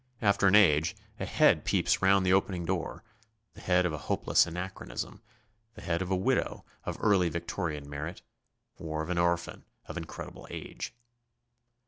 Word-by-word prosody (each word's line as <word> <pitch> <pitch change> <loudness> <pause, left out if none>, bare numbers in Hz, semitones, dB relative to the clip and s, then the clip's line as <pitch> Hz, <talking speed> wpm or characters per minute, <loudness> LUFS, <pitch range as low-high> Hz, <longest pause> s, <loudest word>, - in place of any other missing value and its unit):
After 100 -1 +3
an 95 - +6
age 80 -7 +5 0.2
a - - -3
head - - +4
peeps - - +1
round 95 0 +4
the 90 - +4
opening 95 -2 +1
door, 90 +3 -3 0.5
the - - -13
head 90 0 +3
of 85 - 0
a 75 - -4
hopeless - - +3
anachronism, 90 +3 -6 0.5
the - - -11
head 85 +1 -1
of 95 - -3
a 95 - +2
widow 95 - 0 0.2
of - - -3
early 95 -4 +3
Victorian 85 -3 -3
merit, 75 +5 -6 0.6
or 80 -1 -3
of 85 - -4
an 90 - 0
orphan 85 0 0 0.2
of - - -7
incredible 80 -1 -8
age. 120 - -7
90 Hz, 160 wpm, -30 LUFS, 80-95 Hz, 0.6 s, an